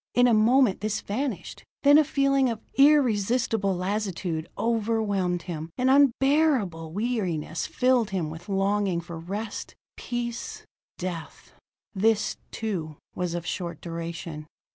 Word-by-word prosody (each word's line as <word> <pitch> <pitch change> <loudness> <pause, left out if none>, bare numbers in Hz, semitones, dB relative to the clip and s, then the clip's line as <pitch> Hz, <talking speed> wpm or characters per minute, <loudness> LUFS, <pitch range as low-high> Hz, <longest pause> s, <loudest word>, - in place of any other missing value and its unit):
In 245 - +6
a 245 - +4
moment 220 -1 +4
this 215 0 -1
vanished. 215 - -4 0.2
Then 290 +1 +8
a - - +5
feeling 275 -2 +2
of 225 -2 -3
irresistible 230 -7 +3
lassitude 185 -4 -2
overwhelmed 210 -6 0
him; 165 -3 -5
an 255 +1 +2
unbearable 270 - +3
weariness 185 -7 -2
filled 250 -4 +2
him 175 -6 -2
with 165 +4 -10
longing 195 -2 +1
for 170 -1 -8
rest, 205 +6 -5 0.2
peace 240 -1 -5 0.3
death. 175 -3 -6 0.4
This, 215 +2 +1
too, 170 -9 -4 0.2
was 175 -1 -2
of 175 0 -4
short 175 -3 -4
duration. 165 -2 -6
205 Hz, 120 wpm, -26 LUFS, 175-240 Hz, 0.4 s, Then